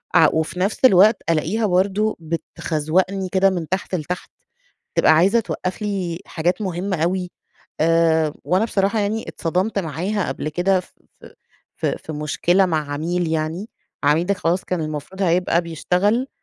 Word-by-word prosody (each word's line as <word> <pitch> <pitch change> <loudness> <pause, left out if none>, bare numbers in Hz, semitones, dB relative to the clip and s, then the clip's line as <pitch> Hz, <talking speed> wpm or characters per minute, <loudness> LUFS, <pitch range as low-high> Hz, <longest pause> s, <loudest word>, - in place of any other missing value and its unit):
ع - - +7
وفي 160 +3 -1
نفْس 200 +7 +1
الوقت 210 0 +6
ألاقيها 165 +8 +1
برضه 200 +3 +1
بتخزوَقني 165 +3 -2
كده 190 +1 +3
من 175 -4 -3
تحت 190 0 -2
لتحت، 180 +2 -5 0.7
تبقى - - +5
عايزة 190 +9 +4
توقّف 185 -2 -4
لي 185 -5 -2
حاجات 175 +5 -1
مهمّة 185 0 -2
أوي. 180 +1 -1 0.5
آآ 160 -1 +3
وأنا 180 +8 +2
بصراحة 200 0 +1
يعني 210 +2 -2
أتصدمت 185 +6 -1
معاها 180 +5 -2
قبل - - -3
كده 180 +4 +2
ف - - -19 0.3
ف - - -13 0.5
ف - - -1
في 160 - -3
مشكلة 170 +5 +1
مع 155 -4 -2
عميل 170 +4 -1
يعني، 160 +6 -2 0.4
العميل 155 +4 +3
ده 200 - +2
خلاص 175 0 -1
كان 180 -2 -2
المفروض 155 +5 -5
هيبقى 175 -1 +2
بيشتغل، 180 - 0
180 Hz, 150 wpm, -21 LUFS, 160-195 Hz, 0.7 s, ع